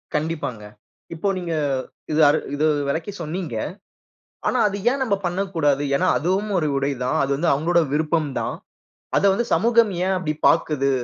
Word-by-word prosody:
கண்டிப்பாங்க. 150 -8 -2 0.5
இப்போ 165 +5 -2
நீங்க 175 -2 -4 0.6
இத 155 - +1
அரு 150 - +3 0.2
இத 145 - -1 0.3
வெளக்கி 160 +7 -2
சொன்னீங்க. 165 -4 -4 0.9
ஆனா, - - +1
அத 200 - -3 0.2
ஏன் 275 +1 -2
நம்ப 225 -6 +1
பண்ணக்கூடாது? 175 -6 0
ஏன்னா, 185 +6 +1
அதுவும் 190 +6 -1
ஒரு 155 -3 +1
உடை 140 +1 0
தான். 125 - 0
அது 140 - -1
வந்து 165 +4 +1
அவுங்கோட 170 +4 +2
விருப்பம் 155 0 +1
தான். - - -3 0.6
அத - - +1
வந்து 235 +5 0
சமூகம் 230 +4 +3
ஏன் 190 0 +1
அப்டி 160 -4 -2
பாக்குது? 140 -3 +2
165 Hz, 160 wpm, -22 LUFS, 150-190 Hz, 0.9 s, அரு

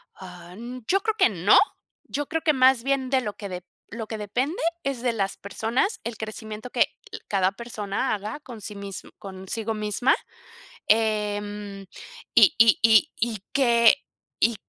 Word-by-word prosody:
Ah, 180 -1 -11 0.3
yo 390 +2 +2
creo 440 +1 -1
que 375 - +5
no, 190 -1 +4 0.5
yo 290 0 -3
creo 325 0 -2
que 310 - +3
más 260 -2 +4
bien 270 -1 0
de 260 -1 +2
lo 210 -4 -4
que 185 -3 -6 0.3
lo 225 0 -6
que 220 - -5
de-depende 245 - -2 0.2
es 275 -3 -2
de 245 -1 +1
las 195 -3 -2
personas, 230 - -1
el 235 -2 -5
crecimiento 220 +1 -7
que, - - -1 0.3
eh, - - -6
cada 190 -1 +2
persona 210 -3 -3
haga 215 +5 -4
con 240 -6 -10
sí 205 +1 -7
mismo 200 -1 -7
consigo 200 +4 -4
misma, 215 +5 +1 0.7
em, 210 -2 0 0.5
y - - +7
y 225 -1 +6
y 220 -2 +6
y 225 -1 -1
que 240 0 +5 0.4
y 230 0 +3
220 Hz, 160 wpm, -25 LUFS, 205-250 Hz, 0.7 s, y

